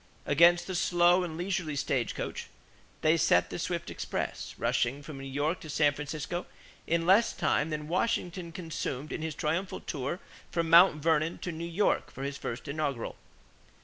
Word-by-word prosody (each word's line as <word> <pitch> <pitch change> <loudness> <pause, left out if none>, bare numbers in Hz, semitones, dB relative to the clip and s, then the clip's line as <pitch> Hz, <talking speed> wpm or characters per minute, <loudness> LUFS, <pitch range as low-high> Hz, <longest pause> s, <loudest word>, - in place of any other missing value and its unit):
Against 170 +4 +5
the 190 - -4
slow 175 +1 +4
and 160 -3 -5
leisurely 175 -4 -2
stagecoach, 135 -3 -2 0.5
they - - +4
set - - +3
the - - -4
swift - - -3
express, - - -4
rushing 135 +5 0
from 145 -2 -8
New 135 - -7
York 145 +6 -1
to 155 - -10
San 145 -1 +3
Francisco 150 +4 -4 0.4
in 165 0 +1
less 195 +6 +5
time 150 - +1
than 150 -1 -4
Washington 180 -2 -1
consumed 155 -4 -4
in - - -4
his 160 -1 -3
triumphal 170 +5 -1
tour 140 +5 -4 0.3
from 165 -1 -1
Mt. 165 -3 +7
Vernon 160 0 +2
to 180 - -4
New 165 +1 -5
York 195 +5 +1
for 135 - -8
his 140 0 -4
first 120 +5 -5
inaugural. 140 -4 -2
160 Hz, 165 wpm, -30 LUFS, 145-175 Hz, 0.5 s, Mt